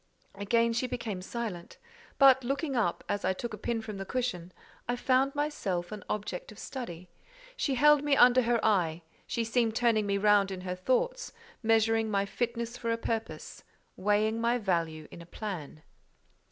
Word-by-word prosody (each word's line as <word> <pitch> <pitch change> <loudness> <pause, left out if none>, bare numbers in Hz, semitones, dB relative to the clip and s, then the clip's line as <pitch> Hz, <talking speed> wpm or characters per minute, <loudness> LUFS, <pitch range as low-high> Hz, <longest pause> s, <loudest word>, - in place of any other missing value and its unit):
Again 230 +4 +1
she 235 +2 0
became 225 -6 -4
silent; 195 -4 -6 0.4
but 265 -2 +6
looking 275 +3 -2
up, 215 -8 0
as 205 0 -2
I - - +2
took 230 +4 -6
a - - -5
pin 225 0 -2
from 215 -2 -6
the 195 - -4
cushion, 190 -6 -3 0.4
I 245 - +1
found 260 +2 +2
myself 200 -12 -2
an 210 -2 -7
object 205 -3 -4
of 215 - -14
study: 185 -10 -7 0.5
she 280 - 0
held 295 +2 +5
me 290 -1 +3
under 250 0 +6
her 235 -1 +1
eye; 175 -6 +1 0.2
she 235 - -1
seemed 225 -1 +1
turning 225 -3 +2
me 200 0 +1
round 205 -1 +4
in 190 -1 -5
her 180 0 -3
thoughts—measuring 225 - 0
my 200 -1 +1
fitness 235 +2 -3
for 230 -2 -2
a 230 - 0
purpose, 225 -1 -4 0.3
weighing 210 +3 +1
my 235 +1 +2
value 165 -7 -1
in 170 - -10
a 170 - -13
plan. 175 -7 -7
225 Hz, 170 wpm, -30 LUFS, 195-245 Hz, 0.5 s, but